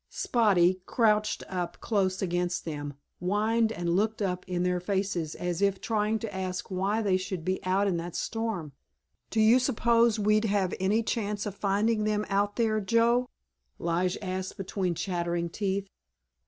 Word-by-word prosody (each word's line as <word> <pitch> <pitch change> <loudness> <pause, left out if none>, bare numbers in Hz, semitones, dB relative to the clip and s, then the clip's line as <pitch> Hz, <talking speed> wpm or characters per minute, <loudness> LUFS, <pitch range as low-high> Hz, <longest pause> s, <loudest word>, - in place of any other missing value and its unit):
Spotty, 185 -6 +2
crouched 215 -2 +2
up 175 -2 -4
close 190 -3 0
against 175 0 -1
them, 145 -3 -5 0.2
whined 220 +5 +1
and 175 -4 -1
looked 220 +3 +1
up 180 -3 -1
in 180 -1 0
their 180 0 +1
faces 185 -4 -2
as 175 0 -3
if 200 -1 +2
trying 215 -1 0
to 220 -3 -6
ask 185 0 -4
why 195 +4 0
they 190 -3 +3
should 185 -3 -5
be 185 +1 -1
out 190 +2 +2
in 180 -3 +1
that 170 0 -5
storm. 220 -9 -3 0.6
"Do 220 - -1
you 220 +4 +6
suppose 235 -3 +3
we'd 215 +1 +2
have 200 -3 +1
any 205 +5 +2
chance 210 -3 -2
of 205 - -3
finding 210 +2 +1
them 210 0 0
out 205 +1 +1
there, 220 -2 +1
Joe?" 235 +4 +2 0.5
Lige 175 +2 0
asked 185 0 -4
between 185 -2 -2
chattering 170 -1 -2
teeth. 200 +1 -2
195 Hz, 160 wpm, -28 LUFS, 180-215 Hz, 0.6 s, you